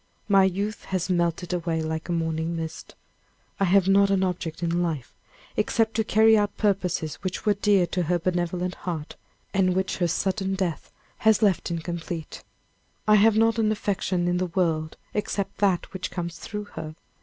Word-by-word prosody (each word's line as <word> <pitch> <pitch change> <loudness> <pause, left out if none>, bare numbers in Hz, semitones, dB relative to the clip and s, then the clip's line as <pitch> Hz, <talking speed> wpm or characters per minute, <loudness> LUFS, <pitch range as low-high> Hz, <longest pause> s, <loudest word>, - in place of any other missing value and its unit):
My 195 -2 +5
youth 200 +3 -2
has 185 0 -2
melted 170 0 0
away 165 -2 -1
like 160 +2 -4
a - - 0
morning 165 0 -1
mist. 160 -1 -6 0.6
I 195 - +3
have 190 +1 +4
not 200 +1 +5
an 195 -1 +2
object 175 -2 -3
in 170 +1 +1
life 160 -8 -3 0.4
except 220 +1 +1
to 220 - +1
carry 220 +1 +5
out 205 -1 +1
purposes 185 -6 0
which 185 +3 -4
were 210 - +4
dear 200 -2 +3
to 180 +1 -2
her 175 +1 +1
benevolent 180 +1 -1
heart, 165 -4 -5 0.4
and 185 -2 +2
which 190 0 -1
her 175 - +1
sudden 190 +3 -1
death 185 -4 -3 0.3
has 220 0 +3
left 195 -4 +2
incomplete. 170 -1 -5 0.6
I 215 - +6
have 215 +1 +5
not 225 +1 +3
an 215 -1 +3
affection 190 -4 -1
in 175 0 +1
the 185 0 0
world 165 -3 -1 0.2
except 205 -1 -2
that 195 -4 +1
which 190 -1 -4
comes 170 -2 -5
through 210 -1 -5
her. 155 -1 -6
180 Hz, 175 wpm, -25 LUFS, 170-200 Hz, 0.6 s, I